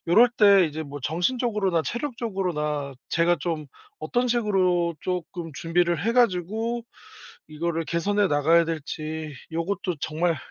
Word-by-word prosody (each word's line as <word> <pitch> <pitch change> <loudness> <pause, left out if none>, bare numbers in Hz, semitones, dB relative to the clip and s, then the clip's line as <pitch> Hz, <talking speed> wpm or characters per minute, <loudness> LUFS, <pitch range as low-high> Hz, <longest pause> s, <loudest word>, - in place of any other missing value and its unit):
요럴 225 +9 +6
때 200 -4 +6
이제 155 +1 -5
뭐 145 0 -8
정신적으로나 195 - 0
체력적으로나 185 - -2
제가 175 +1 +2
좀 155 -1 -3 0.3
'어떤 245 0 0
식으로 185 -7 +2
쪼끔 175 -2 -4
준비를 170 +4 0
해 230 - +2
가지고 225 +1 +1 0.6
이거를 165 +2 -2
개선해 200 +6 +1
나가야 165 +2 +4
될지?' 155 -1 -5 0.2
요것도 180 +2 -2
정말 165 +3 0
예 - - -5
175 Hz, 295 characters per minute, -25 LUFS, 160-205 Hz, 0.6 s, 요럴